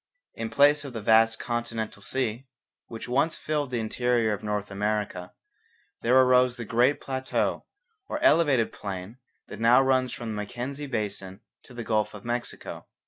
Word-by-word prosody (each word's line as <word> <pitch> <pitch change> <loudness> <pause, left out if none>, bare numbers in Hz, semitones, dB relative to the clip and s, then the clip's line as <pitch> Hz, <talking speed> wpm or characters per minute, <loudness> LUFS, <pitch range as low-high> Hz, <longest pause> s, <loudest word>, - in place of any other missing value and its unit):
In 115 - -4
place 145 +3 +4
of 140 -3 -8
the 115 - -5
vast 115 +1 +5
'Continental 115 -3 -4
Sea,' 125 +2 -2 0.4
which 115 +1 -8
once 140 +6 +1
filled 150 -3 -2
the 125 -2 -2
interior 115 0 +1
of 105 - -5
North 105 -1 -3
America, 100 -3 -2 0.7
there 125 +3 +5
arose 125 -1 +4
the 120 - -5
great 120 +5 +2
plateau 130 -1 -2 0.4
or - - -3
elevated 145 - +4
plain 100 +4 -7 0.3
that - - -8
now 115 +3 +6
runs 130 -1 +2
from 120 -2 -6
the - - -3
Mackenzie 125 +8 -5
basin 100 -5 -4 0.2
to 125 - -13
the 120 - -5
Gulf 110 -1 0
of 105 - -11
Mexico. 120 0 -5
120 Hz, 160 wpm, -27 LUFS, 110-130 Hz, 0.7 s, now